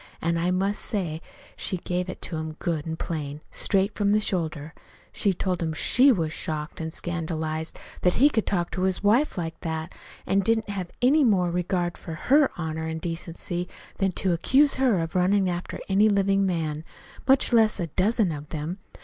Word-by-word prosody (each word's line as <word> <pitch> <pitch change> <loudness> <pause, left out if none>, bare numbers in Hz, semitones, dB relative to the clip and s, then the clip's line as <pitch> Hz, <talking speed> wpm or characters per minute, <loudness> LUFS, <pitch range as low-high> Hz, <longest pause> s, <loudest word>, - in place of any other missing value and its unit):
An' 170 +1 0
I 175 +2 +1
must 195 +3 0
say 170 -6 -2 0.3
she 185 - -2
give 180 +1 -3
it - - -7
to 170 - -3
him 160 0 -4
good 160 -1 -3
an' 160 - -2
plain, 150 -3 -4
straight 195 +1 +1
from 205 -1 +1
the 215 - +4
shoulder. 160 -6 -3 0.4
She 200 - +1
told 185 -1 -2
him 160 -1 -1
she 255 - +4
was 165 -8 0
shocked 155 +1 -4
an' 160 - -3
scandalized 160 -2 -3 0.2
that 180 - +3
he 280 - +6
could 220 - 0
talk 175 -3 0
to 185 - -3
his 190 +1 0
wife 230 +6 +3
like 165 -2 -4
that; 160 0 -4 0.3
an' 195 - +2
didn't 225 +2 +2
he - - -5
have 185 -3 -4
any 290 +4 +5
more 185 -7 +3
regard 175 0 -1
for 165 - -7
her 280 - +4
honor 160 -1 -3
and 160 0 -3
decency 175 +1 -4 0.3
than 195 -2 +1
to 185 0 +1
accuse 270 - +4
her 255 -6 +2
of 165 +2 -4
runnin' 190 +1 +3
after 175 0 -4
any 200 +2 +4
man 205 - +2
living 185 -6 +1 0.4
much 265 -1 +4
less 220 -3 +4
a 175 - 0
dozen 195 - +1
of 150 -1 -7
them! 160 +5 -4
180 Hz, 190 wpm, -26 LUFS, 160-200 Hz, 0.4 s, he